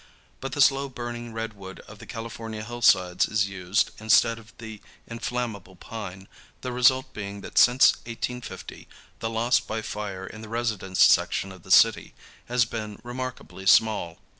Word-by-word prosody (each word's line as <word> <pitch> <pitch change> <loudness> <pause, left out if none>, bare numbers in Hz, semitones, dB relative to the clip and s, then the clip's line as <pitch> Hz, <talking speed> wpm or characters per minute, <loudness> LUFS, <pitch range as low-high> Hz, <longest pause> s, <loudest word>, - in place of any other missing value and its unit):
But 135 0 -5
the 145 - 0
slow 140 0 +4
burning 120 -2 -6
redwood 105 -4 -7
of - - -14
the - - -12
California 115 -1 -6
hillsides 100 -6 +3
is 105 -1 +1
used 95 +2 0
instead 110 +1 +4
of 115 0 -16
the 110 -2 -9 0.3
inflammable 115 -5 -4
pine, 95 -1 -8 0.3
the 125 - -4
result 130 +1 +3
being 100 -1 -6
that - - 0
since 125 +2 +7 0.2
1850 125 +1 -6 0.3
the 115 - -2
loss 115 +2 +2
by 110 0 -5
fire 100 -3 -5
in 110 +3 -10
the 110 - -10
residence 105 -5 +1
section 95 - +2
of 95 -2 -13
the 95 - -16
city 110 +3 +4 0.3
has 125 -1 +2
been 110 -2 -6
remarkably 120 -5 -6
small. 100 -5 +4
110 Hz, 155 wpm, -26 LUFS, 100-120 Hz, 0.3 s, since